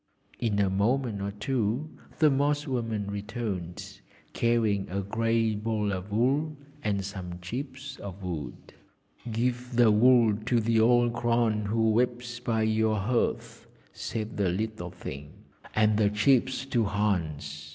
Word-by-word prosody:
In 110 -4 0
a 100 -1 +3
moment 105 +3 0
or 100 - -2
two 115 +6 -1 0.3
the 155 -2 +5
Moss 145 +2 +1
woman 115 -6 -2
returned, 100 -4 -5 0.3
carrying 110 -4 +1
a 100 +2 -2
grey 115 +2 +1
ball 105 -1 -1
of 95 +2 -5
wool 140 +8 +1 0.3
and 100 -2 0
some 90 -3 -6
chips 130 +8 -6
of 100 -1 -8
wood. 80 -9 -6 0.6
'Give 125 +2 -1
the 120 -2 +6
wool 115 0 +5
to 120 -2 +3
the 115 0 +2
old 120 +1 +4
crone 115 -3 +1
who 110 +1 +2
weeps 120 +1 0
by 115 -2 0
your 110 0 +2
hearth,' 115 +5 -1 0.3
said 110 -1 -5
the 100 -3 +2
little 100 -1 -3
thing, 75 -5 -8 0.4
'and 110 -1 +3
the 105 -2 +4
chips 130 +5 +2
to 120 -4 +1
Hans. 80 -8 -2
110 Hz, 140 wpm, -28 LUFS, 100-120 Hz, 0.6 s, the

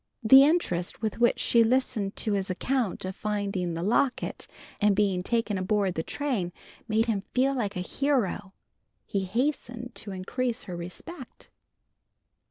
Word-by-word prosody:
The 265 +5 +9
interest 235 - 0
with 220 +1 -2
which 240 0 +4
she 235 -1 +4
listened 225 -4 0
to 215 - -1
his 195 -1 -1
account 230 +1 -1
of 185 0 -4
finding 200 -5 -2
the 165 - -3
locket 240 +6 0 0.3
and 205 -1 +4
being 195 -3 +2
taken 225 -1 0
aboard 195 0 +1
the 160 - -2
train 230 - -2 0.4
made 220 +1 +2
him 220 -4 0
feel 265 +2 +3
like 210 -6 -2
a 180 - -2
hero. 205 -4 -1 0.5
He 195 -1 -2
hastened 245 +2 -2
to 210 - -7
increase 235 +6 -2
her 180 - -6
respect. 235 - -9
210 Hz, 150 wpm, -27 LUFS, 190-250 Hz, 0.5 s, The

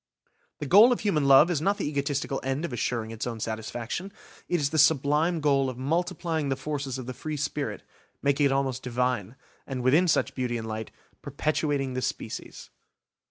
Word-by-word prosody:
The - - -5
goal 205 - +7
of 245 - 0
human 155 -9 +1
love 140 +6 +7
is 155 -4 0
not 200 +4 +1
the - - -2
egotistical 140 -1 -2
end 135 +5 -1
of 145 - -6
assuring 115 -1 -2
its 115 +1 -4
own 115 -2 -4
satisfaction–it 120 - -5
is 145 -1 0
the 160 - +1
sublime 150 +3 +3
goal 140 -2 +2
of 125 - -7
multiplying 160 +1 -1
the 135 - +1
forces 135 -1 -4
of 130 - -6
the 130 - -5
free 155 +3 -5
spirit, 140 -7 -3 0.4
making 140 +1 +2
it - - -1
almost 135 -2 0
Divine, 125 -3 -1 0.3
and, 130 -2 -4
within 150 +8 +4
such 165 - +1
beauty 125 -2 -2
and 110 - -5
light, 110 0 -5 0.3
perpetuating 145 -3 -1
the 130 - -2
species. - - -5
140 Hz, 180 wpm, -27 LUFS, 125-155 Hz, 0.4 s, goal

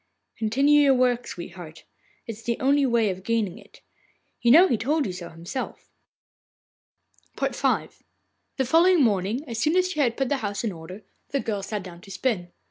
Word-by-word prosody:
'Continue 275 +7 +4
your 275 -2 +5
work, 250 -1 +1
sweetheart. 175 -2 -9 0.4
It - - -5
is 220 0 -11
the 235 +1 -2
only 275 +1 +3
way 230 -4 +2
of 185 0 -7
gaining 215 -5 -1
it. - - -19 0.6
You 240 - +3
know 335 +9 +8
he 245 - +1
told 285 +7 0
you 190 - -3
so 175 -1 -8
himself.' 170 +10 -7 1.5
V - - +1
The 265 - -4
following 335 +4 +5
morning, 215 +5 0
as 230 -2 -4
soon 305 +8 +2
as 365 0 +2
she 305 - -5
had 240 -5 +1
put 270 -2 0
the 285 - +1
house 205 -4 -3
in 225 - -1
order, 180 +4 -10 0.3
the 280 - -1
girl 210 -5 -3
sat 200 0 -4
down 175 -2 -11
to 195 - -15
spin. 185 -3 -2
230 Hz, 185 wpm, -25 LUFS, 195-275 Hz, 1.5 s, know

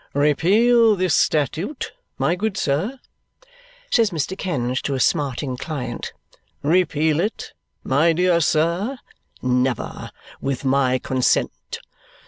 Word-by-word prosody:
"Repeal 210 - +4
this 185 -4 0
statute, 160 - 0 0.3
my - - +1
good 200 +1 -2
sir?" 190 - -1 0.9
says 225 -3 +4
Mr. 170 +1 -3
Kenge 130 -10 -2
to 140 - -2
a - - -2
smarting 135 -3 0
client. 130 -4 -5 0.5
"Repeal 160 -1 +2
it, 210 +6 -3 0.3
my 145 +6 +3
dear 175 +1 +2
sir? 170 - +1 0.5
Never, 125 -1 -1 0.3
with 135 0 -3
my 130 -1 +2
consent. 130 0 -1
155 Hz, 110 wpm, -21 LUFS, 135-185 Hz, 0.9 s, Repeal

